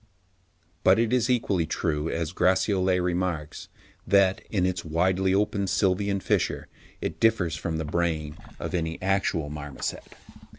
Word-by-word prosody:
But - - +6
it 115 +1 +1
is 125 -1 +2
equally 100 -9 +1
true, 80 -1 -1
as 85 0 -2
Gratiolet 95 0 +2
remarks, 90 -4 -2 0.4
that, 100 -1 +4
in 95 -4 +1
its 90 -1 -1
widely 90 +4 +1
open 100 0 +1
sylvian 95 +2 +1
fissure, - - 0 0.3
it 80 - -4
differs 105 -8 +2
from 80 +1 -3
the 80 - -3
brain 80 -2 -1 0.2
of - - -5
any 80 -2 -2
actual 95 -6 0
marmoset. 75 -2 -6
90 Hz, 135 wpm, -26 LUFS, 80-100 Hz, 0.4 s, But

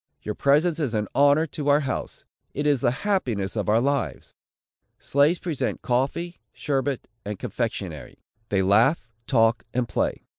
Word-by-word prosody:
Your 105 - -3
presence 150 +7 +2
is 135 -7 -1
an 105 -1 -1
honor 145 +3 +4
to 150 -2 -6
our 145 +1 +5
house! 135 -3 -4 0.3
It 145 - -2
is 145 -4 +2
the - - +3 0.2
happiness 120 - 0
of 105 -1 -1
our 110 +2 +4
lives!" 140 +3 -2 0.6
Slaves 145 +5 +2
present 165 -6 -3
coffee, 140 +8 -1
sherbet, 140 -2 -2 0.2
and 105 0 -5
confectionary. - - -5 0.3
They 95 -1 +2
laugh, 115 - +3 0.2
talk 115 -3 +3
and 125 -1 +1
play. - - -1
135 Hz, 150 wpm, -25 LUFS, 115-150 Hz, 0.6 s, our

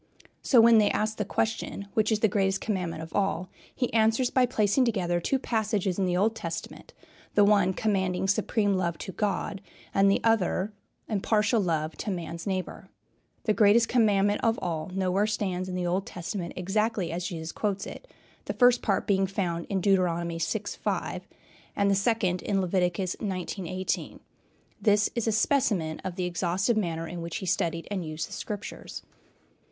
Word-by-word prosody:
So, 250 - +4
when 230 -1 +7
they 210 - +4
ask 215 +1 -1
the 210 - -1
question, 220 -1 -2
"Which 215 0 +2
is 215 -1 +1
the 220 - +5
greatest 195 -1 +1
commandment 175 -6 -3
of 160 - -10
all?" 195 -3 0 0.3
he 245 - -1
answers 225 +3 +3
by 255 -1 +3
placing 220 +1 +2
together 185 -7 0
two 270 +10 0
passages 210 -6 -1
in 190 - +2
the 180 -1 +1
Old 215 +4 +2
Testament, 165 -5 -7 0.4
the 205 - +6
one 200 -3 +4
commanding 190 -3 0
supreme 205 +1 +1
love 170 -3 -1
to - - -6
God 195 -1 -2 0.3
and 195 0 +4
the 195 - +3
other 210 -2 +1 0.3
impartial 215 +2 +2
love 160 -3 -1
to - - -4
man's 170 -1 -5
neighbor. 185 -2 -4 0.5
The 215 - +2
greatest 220 +2 +5
commandment 205 -4 +3
of 225 0 +2
all 160 -2 -3
nowhere 195 +2 +1
stands 185 -4 -2
in 180 - -4
the 180 -1 -1
Old 185 +3 -1
Testament 175 0 -5
exactly 195 0 -1
as 175 +1 -3
Jesus 160 -2 -5
quotes 200 -2 -2
it, - - -9 0.4
the - - -3
first 245 -1 +5
part 200 - 0
being 195 -1 +2
found 175 -3 -2
in 195 -2 0
Deuteronomy 170 -3 +1
vi. 205 +6 -1 0.2
5, - - -2 0.5
and 200 0 +2
the - - +4
second 195 -3 +1
in 200 -1 0
Leviticus 180 0 0
xix. 190 -1 -3
18. 185 0 -3 0.6
This 210 -1 +3
is 235 -1 -2
a - - +3
specimen 215 - +1
of 185 -2 -5
the 180 - -2
exhaustive 180 +5 0
manner 165 -5 -1
in 175 +1 -6
which 170 -1 -5
he - - -5
studied 170 -2 -1
and 190 -3 -2
used 155 0 -4
the - - -9
Scriptures. 205 -1 -6
195 Hz, 175 wpm, -27 LUFS, 180-215 Hz, 0.6 s, when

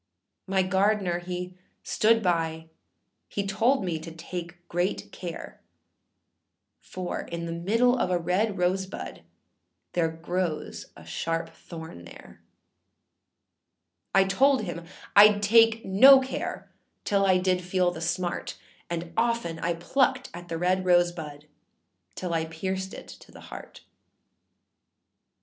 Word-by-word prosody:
My 190 0 +2
gardener 190 -1 +1
he 180 +1 -6 0.3
stood 225 +1 +3
by, 165 -2 -1 0.6
he 200 - -2
told 225 +4 +2
me 165 -3 -2
to 165 +1 -8
take 175 +1 -8
great 175 +3 -2
care, 175 -3 -8 1.2
For 185 -1 -5
in 170 0 -6
the 165 - -4
middle 230 +9 +2
of 185 - +1
a 180 - +2
red 190 +5 0
rose 185 +1 +1
bud 195 - -8 0.7
there 165 -2 +2
grows 165 0 -3
a - - -13
sharp 165 0 -2
thorn 160 - -10
there; - - -14 1.7
I 195 - +7
told 260 +6 +3
him 170 -3 -6 0.3
Iâd 210 0 +8
take 225 +1 +5
no 265 +8 +8
care 265 0 -5 0.3
till 200 -1 +2
I 190 -1 +4
did 185 0 +1
feel 180 0 +1
the 160 - -8
smart, 175 +1 -2 0.3
And 170 0 -4
often 230 -8 0
I 170 +1 -1
plucked 260 +9 0
at 175 0 -9
the 165 -1 -3
red 185 +2 +1
rose 175 -1 +4
bud 150 -3 -9 0.7
till 180 -2 -4
I 160 -1 0
pierced 190 +4 -4
it - - -10
to - - -14
the - - -13
heart. - - -10
180 Hz, 130 wpm, -27 LUFS, 170-200 Hz, 1.7 s, Iâd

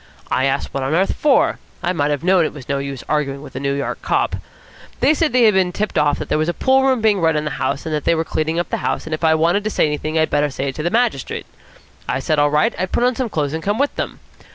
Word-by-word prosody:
I 130 - +2
asked 135 +1 -1
what 135 - -2
on 135 +4 0
earth 190 +3 +2
for. 290 -3 +2 0.2
I 180 0 +1
might 145 -4 0
have 145 0 -2
known 185 -1 +4
it - - -2
was 140 -4 -11
no 140 -1 -1
use 140 -2 -5
arguing 140 -2 -1
with - - -12
a - - -3
New 140 0 -1
York 140 - -3
cop. - - 0 0.6
They 305 - +4
said 315 -1 +1
they 250 0 +4
had 215 -2 +6
been 185 -2 +2
tipped 210 +4 -3
off 145 -1 +2
that - - -5
there - - 0
was 155 +2 0
a 175 - -2
pool 265 0 +3
room 260 -3 +2
being 215 -3 +3
run 160 -1 +3
in 150 0 -1
the 150 - -2
house, 135 +4 -1
and 160 - -3
that 150 -1 -1
they 170 - +3
were 160 - 0
cleaning 160 +1 -1
up 175 - -1
the - - 0
house, - - -2
and 160 - -5
if 155 - -4
I 160 -1 +4
wanted 170 +6 +2
to 215 - -1
say - - +2
anything 155 +1 -2
I'd 160 0 +2
better 145 0 +2
say 135 0 -3
it 135 - -7
to - - -2
the 170 - 0
magistrate. 230 - -1 0.6
I 125 - +1
said, 150 +3 0
all 145 0 +4
right, 150 +1 +2
I'd 185 0 -2
put - - +1
on 250 0 +2
some 250 -2 -2
clothes 150 -6 -2
and 160 - -3
come 205 +4 -1
with 285 +2 0
them. - - -4
160 Hz, 300 wpm, -19 LUFS, 145-195 Hz, 0.6 s, had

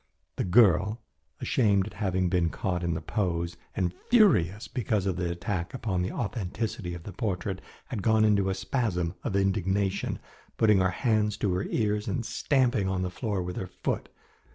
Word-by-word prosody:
The - - 0
girl, 105 +2 +4 0.4
ashamed 100 -6 +2
at 110 - -8
having 95 -3 0
been 90 -2 +2
caught 90 +1 -2
in 85 -1 0
the 80 - -3
pose, 85 -2 -1 0.2
and 90 -4 0 0.2
furious 115 - +4
because 105 -5 -1
of 95 -3 0
the 90 -1 -1
attack 85 +2 -3
upon 105 -8 -1
the 90 - -1
authenticity 105 -4 -3
of 85 - -9
the 100 - -8
portrait, 95 -2 -2 0.3
had 115 -6 -3
gone 110 +2 +4
into 100 -2 +3
a 95 - 0
spasm 95 -5 -1
of - - -2
indignation, 95 0 0 0.4
putting 105 -3 +5
her 95 0 +3
hands 105 -1 +1
to 100 -3 0
her 90 +2 -1
ears 105 -2 0
and 120 - -2
stamping 125 -9 +1
on 95 -1 -1
the 90 - -2
floor 100 -2 -2
with 90 0 -5
her 95 - -3
foot. - - -3
95 Hz, 175 wpm, -28 LUFS, 90-110 Hz, 0.4 s, putting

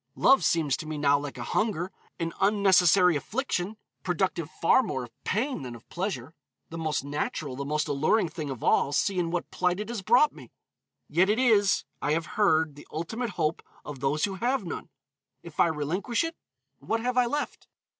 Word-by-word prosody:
Love 270 - +5
seems 155 -6 +2
to 155 - -7
me 155 -1 -4
now 145 -1 +3
like 145 -2 -7
hunger, 180 - -1 0.3
an 165 -1 -2
unnecessary 190 -3 +5
affliction, 210 - -2 0.2
productive 175 -3 -1
far 165 +12 +3
more 130 - -3
of 120 - -14
pain 245 - -1
than 125 -2 -7
of 115 - -15
pleasure; 170 - -4 0.4
the 165 - -5
most 155 -4 -1
natural, 145 -1 -3
the 140 - -4
most 150 +2 -1
alluring 155 +8 +2
thing 155 -2 -6
of 130 -4 -6
all, 140 - +3
see 185 +5 +1
in 170 -1 0
what 175 0 -3
plight 180 +1 0
it 210 +1 -4
has 235 -4 -3
brought 245 +10 +4
me. - - -13 0.6
Yet 175 +6 +3
it 215 - +3
is, 215 -6 +4 0.2
I 145 - +1
have 165 0 0
heard, 160 -6 +2
the 145 - -14
ultimate 225 +10 -3
hope 155 +1 0 0.2
of 145 -3 -7
those 140 +3 +1
who 200 - -4
have 245 -3 +1
none. 170 - -6 0.5
If 170 -3 -12
I - - +6
relinquish 170 - -1
it, 330 0 -4 0.4
what 225 0 -2
have 250 +1 -1
I 250 -1 +4
left? 290 +5 -3
170 Hz, 190 wpm, -27 LUFS, 150-210 Hz, 0.6 s, I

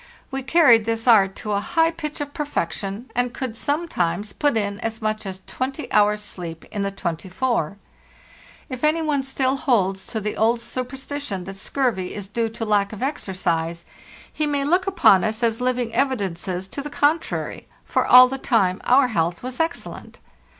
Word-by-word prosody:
We 270 0 -3
carried 260 -6 +5
this 225 +1 -2
art 195 -5 +5
to 210 - -5
a 200 - +1
high 325 +10 +2
pitch 305 -2 -5
of 285 0 -5
perfection, 215 - -3
and 245 +1 0
could 255 -4 -4
sometimes 210 - -1
put 290 -5 +1
in 200 -1 -2
as 225 0 -3
much 215 -1 -2
as 190 0 -6
20 270 +4 -4
hours' 210 0 +3
sleep 170 -5 -6
in 205 - -3
the 200 - 0
24. 190 +2 -2 0.9
If 255 0 -7
any 315 +2 +2
one 295 -3 +1
still 265 0 0
holds 195 -9 +1
to 220 - -3
the 210 0 -3
old 230 +2 +2
superstition 255 -3 -4
that 195 +2 -8
scurvy 195 -3 -1
is 205 -2 -5
due 225 +3 -1
to 225 +1 -5
lack 205 -2 +2
of 215 - -5
ex 280 -3 -2
ercise, 170 -3 -1 0.5
he 305 - 0
may 285 -1 0
look 360 +5 +2
upon 335 - +5
us 220 +2 -2
as 230 +1 +1
living 250 -2 0
evidences 190 -8 -1
to 280 - -5
the 295 - -6
contrary; 295 +3 -1 0.2
for - - +1
all 255 0 +9
the 270 +1 -4
time 195 -8 +1
our 255 +1 +5
health 170 -3 -1
was 255 0 -5
excellent. 330 +1 -3
230 Hz, 180 wpm, -22 LUFS, 195-270 Hz, 0.9 s, all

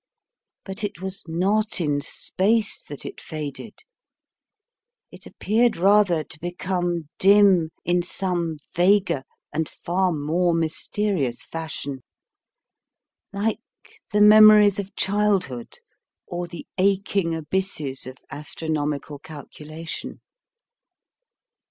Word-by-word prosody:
But 195 +2 -5
it 205 -4 -4
was 190 +1 -6
not 200 +6 +1
in 145 -4 0
space 205 +8 0
that 145 - -9
it - - -8
faded; 155 +7 -7 1.3
it - - -13
appeared 230 +3 +1
rather 190 -3 +4
to 150 +1 -8
become 175 -1 -2
dim 195 -4 +5 0.2
in 175 +1 +2
some 175 -3 -2 0.2
vaguer 185 -4 +3 0.3
and 160 +1 -1
far 180 +1 -1
more 165 +3 +1
mysterious 165 - -1
fashion, 155 -4 -5 1.3
like 210 +2 -1 0.5
the 210 - +2
memories 210 -1 +8
of 195 0 -6
childhood 195 - 0 0.5
or 175 0 -4
the 170 -1 -9
aching 195 -3 +1
abysses 155 -5 -3
of 130 0 -9
astronomical 150 -1 -3
calculation. 155 +2 -8
175 Hz, 95 wpm, -23 LUFS, 155-200 Hz, 1.3 s, memories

